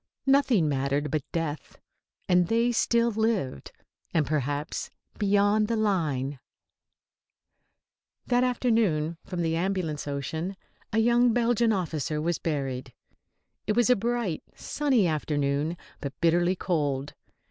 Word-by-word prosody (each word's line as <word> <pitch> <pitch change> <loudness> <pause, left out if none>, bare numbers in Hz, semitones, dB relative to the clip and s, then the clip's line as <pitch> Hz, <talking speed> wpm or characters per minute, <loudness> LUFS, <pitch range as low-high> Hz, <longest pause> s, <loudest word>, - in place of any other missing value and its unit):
Nothing 270 - +4
mattered 140 +1 0
but 155 -1 0
death, 160 -4 -4 0.5
and 180 -1 +4
they 230 +3 +2
still 235 0 +2
lived. 215 - -1 0.4
And 155 -3 +3
perhaps, 145 0 -2 0.3
beyond 205 +1 +3
the 230 - 0
line 150 - 0 1.9
That 245 0 +2
afternoon, 220 -11 +1
from 180 -2 -3
the 165 0 0
Ambulance 170 -5 -2
Ocean, 160 +6 -3 0.4
a 220 - -1
young 240 +1 +4
Belgian 235 -1 +2
officer 160 -6 -1
was 170 +2 -1
buried. 135 -5 -3 0.7
It 210 - +1
was 240 +1 +4
a - - +6
bright, 230 -6 -1
sunny 270 -8 +1
afternoon, 150 0 0 0.2
but 140 -1 -6
bitterly 175 +2 +3
cold. 145 -6 -1
175 Hz, 115 wpm, -27 LUFS, 150-225 Hz, 1.9 s, a